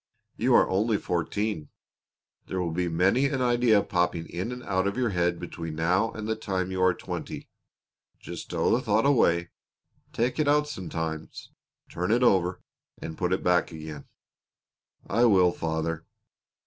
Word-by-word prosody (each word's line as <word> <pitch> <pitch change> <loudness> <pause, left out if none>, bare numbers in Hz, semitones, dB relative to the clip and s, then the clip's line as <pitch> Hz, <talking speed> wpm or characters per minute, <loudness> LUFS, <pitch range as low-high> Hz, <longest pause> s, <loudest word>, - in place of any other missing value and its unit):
You - - +3
are - - +6
only 105 +3 +1
fourteen. 90 0 -2 0.8
There 95 - -3
will 85 -2 -1
be 90 +2 -1
many 95 +11 +3
an 135 -1 -2
idea 120 -4 +3
popping 90 -3 0
in 90 +7 -4
and 125 0 -7
out 95 0 0
of 100 - -2
your 125 -2 +1
head 90 -1 0
between 85 -2 -6
now 90 +7 +2
and 110 -1 -5
the 110 - 0
time 95 -3 -2
you 95 0 -2
are 90 0 +5
twenty. - - -6 0.7
Just - - -7
stow - - 0
the 125 - 0
thought 110 0 +2
away; 85 -11 +3 0.6
take 120 +6 -1
it 150 - +2
out 150 +1 +3
sometimes, 80 - -5 0.4
turn 90 +1 -3
it 120 +2 +3
over, 95 -6 +2 0.4
and 80 0 -6
put 90 +2 -1
it 95 - 0
back 90 -1 +2
again." 80 -3 -8 1.0
"I 115 +5 +2
will, 95 -6 +5
father." 80 -1 -3
95 Hz, 160 wpm, -27 LUFS, 85-115 Hz, 1.0 s, are